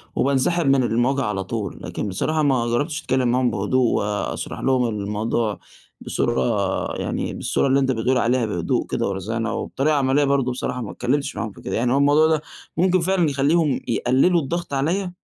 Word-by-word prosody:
وبانسحب 140 +5 +1
من 135 -1 +4
المواجهة 125 +4 +1
على 95 -2 -2
طول، 105 -1 -5
لكن - - -4
بصراحة 155 +11 -1
ما 130 -5 +2
جرَّبتش 145 +7 -1
أتكلم 130 -1 0
معاهم 125 0 +2
بهدوء 125 +6 +1
وأشرح 105 0 -3
لهم 130 -2 +2
الموضوع 105 +1 -2 0.4
بصورة، 65 -1 -1
يعني - - -3
بالصورة - - 0
اللي 135 +1 +3
أنت 135 -1 +1
بتقول 125 +2 +1
عليها 120 0 +2
بهدوء 90 -6 -1
كده - - -1
ورزانة 110 +4 -3
وبطريقة 145 +6 0
عمليَّة 140 +1 +2
برضه، 140 -2 +1
بصراحة 125 0 -3
ما 110 - -5
أتكلِّمتش 140 +3 -1
معاهم 115 -2 -3
في - - -15
كده، - - -4
يعني 120 +2 +1
هو - - +3
الموضوع 145 +2 +4
ده 160 -1 +1 0.4
ممكن 185 +1 +3
فعلًا 175 -2 +2
يخلِّيهم 145 +2 +2
يقلِّلوا 135 +9 +2
الضغط 170 +2 -4
عليَّ؟ 175 +7 0
130 Hz, 175 wpm, -22 LUFS, 115-145 Hz, 0.4 s, من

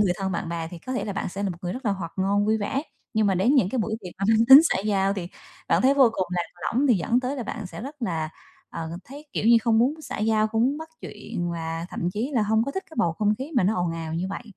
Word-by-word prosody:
người 195 -4 +3
thân, 190 0 -2
bạn 170 0 -3
bè 165 -1 -3
thì 175 - -8
có 255 - -6
thể 255 - -2
là 205 - -3
bạn 195 - -3
sẽ 195 +3 -5
một 200 - 0
người 175 0 -2
rất 255 +2 -7
là 210 - +2
hoạt 175 -4 -5
ngôn, 200 +2 +1
vui 220 +1 +3
vẻ, 265 +7 -2 0.3
nhưng 215 -1 +3
mà 195 - +2
đến 200 +10 +3
những 250 -10 +4
cái 260 - -2
buổi 220 0 -1
tiệc 180 -4 -9
mà 195 - -1
mang 225 +1 +4
tính 270 +2 +12
xã 325 - +1
giao 195 -1 +1
thì 175 -3 -5 0.4
bạn - - +3
thấy 265 +2 +5
vô 270 -3 +6
cùng 185 - -1
lạc 180 -1 0 0.3
lõng 260 +5 +2
thì 250 - +5
dẫn 215 +7 +1
tới 260 +3 -3
là 255 - -3
bạn 220 -2 -5
sẽ 180 - -9
rất 280 +4 -7
là, 160 -8 -1 0.4
ờ, 160 -1 -5
thấy, 285 +4 -11
kiểu - - -2
như, 235 0 +7
không 225 -1 +3
muốn 255 +6 +3
xã - - -6
giao, 215 0 +2
không 225 +1 0
muốn 275 +5 +1
bắt 320 - -8
chuyện 175 0 -5
và 165 0 -4
thậm 175 - -2
chí 225 +8 -2
là 230 - +3
hông 220 +2 +2
có 280 - -3
thích 385 +7 -4
cái - - -12
bầu 170 - +2
không 210 +4 +1
khí 275 +5 -6
mà - - +4
nó 200 +4 +2
ồn 175 -2 0
ào 165 -1 -5
như 175 +3 -2
vậy. 195 - -5
210 Hz, 305 wpm, -25 LUFS, 180-245 Hz, 0.4 s, tính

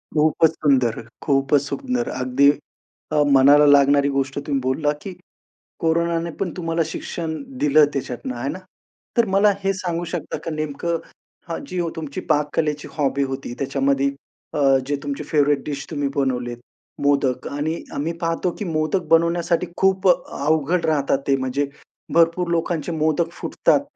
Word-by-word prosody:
खूपच 155 +1 +4
सुंदर, 130 -7 +1 0.2
खूपच 135 0 +2
सुंदर. 250 - -2
अगदी 130 +3 +4 0.6
अ, 150 -1 +4
मनाला 140 +2 +7
लागणारी 140 0 +5
गोष्ट 135 0 -1
तुम्ही 140 -2 +1
बोलला, 140 +4 0
की 195 - -6 0.7
कोरोनाने 170 0 0
पण 195 -3 -1
तुम्हाला 165 -1 -1
शिक्षण 160 0 -4 0.3
दिलं 150 +1 +5
त्याच्यातून 130 -1 -4
आहे 120 +3 -3
ना, 185 - -5 0.6
तर 235 - +5
मला 205 +1 +5
हे 195 - +2
सांगू 175 -2 -3
शकता 170 -3 -3
का 165 - -2
नेमकं 155 +2 -2 0.5
हा 165 - -2
जी 180 -1 -4 0.2
तुमची 155 -3 -5
पाककलेची 150 0 0
हॉबी 140 -1 +1
होती, 135 -2 -4
त्याच्यामध्ये 135 0 +1 0.5
अ, - - -2 0.3
जे 145 - 0
तुमचे 145 +1 -4
फेव्हरेट 145 -2 +2
डिश 140 -2 -4
तुम्ही 145 -1 -1
बनवलेत 125 -3 -1 0.5
मोदक 140 -3 +1
आणि 150 +3 -2 0.2
आम्ही 155 +4 -2
पाहतो, 165 +2 0
की 210 - -3
मोदक 160 +2 0
बनवण्यासाठी 170 +1 +2
खूप 190 0 +2
अवघड 160 0 +1
राहतात 145 -3 +2
ते. 140 - +4
म्हणजे 130 +2 -1 0.5
भरपूर 170 +1 +3
लोकांचे 170 -1 -1
मोदक 160 +1 0
फुटतात. 275 - +1
150 Hz, 145 wpm, -22 LUFS, 140-170 Hz, 0.7 s, मनाला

